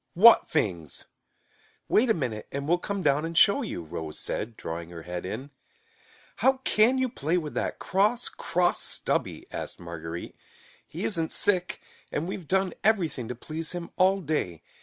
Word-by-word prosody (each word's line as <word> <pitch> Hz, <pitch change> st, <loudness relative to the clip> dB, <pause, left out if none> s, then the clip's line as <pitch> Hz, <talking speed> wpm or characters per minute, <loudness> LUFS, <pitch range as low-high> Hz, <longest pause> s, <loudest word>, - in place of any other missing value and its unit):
"What 225 Hz, +6 st, +8 dB
fings?" 90 Hz, -, -1 dB, 0.8 s
"Wait 235 Hz, +3 st, +3 dB
a 225 Hz, -, +4 dB
minute 120 Hz, -8 st, -3 dB
and 140 Hz, +1 st, -4 dB
we'll 175 Hz, +2 st, +3 dB
come 200 Hz, 0 st, -3 dB
down 145 Hz, 0 st, +3 dB
and 165 Hz, 0 st, -3 dB
show 200 Hz, +11 st, +6 dB
you," 200 Hz, -, -4 dB
Rose 80 Hz, 0 st, -6 dB
said, 115 Hz, +1 st, -4 dB
drawing 85 Hz, +1 st, -5 dB
her 85 Hz, -2 st, -9 dB
head 90 Hz, +1 st, -5 dB
in. 130 Hz, +9 st, -6 dB, 0.9 s
"How 265 Hz, -, +4 dB
can 230 Hz, +5 st, +4 dB
you 260 Hz, 0 st, +2 dB
play 170 Hz, -, -1 dB
with 155 Hz, -4 st, -3 dB
that -, -, -2 dB
cross, 210 Hz, +6 st, +1 dB
cross 175 Hz, 0 st, 0 dB
Stubby?" -, -, 0 dB
asked -, -, -5 dB
Marguerite. 85 Hz, 0 st, -7 dB, 0.5 s
"He -, -, -6 dB
isn't 160 Hz, +8 st, +1 dB
sick, 180 Hz, -3 st, +3 dB, 0.3 s
and 155 Hz, +3 st, -2 dB
we've 185 Hz, -3 st, -5 dB
done 190 Hz, -1 st, +1 dB
everything 170 Hz, -, +1 dB
to 125 Hz, -, -4 dB
please 155 Hz, +7 st, -5 dB
him 175 Hz, -1 st, -6 dB
all 190 Hz, +1 st, +3 dB
day. 140 Hz, -, -2 dB
160 Hz, 165 wpm, -27 LUFS, -, 0.9 s, What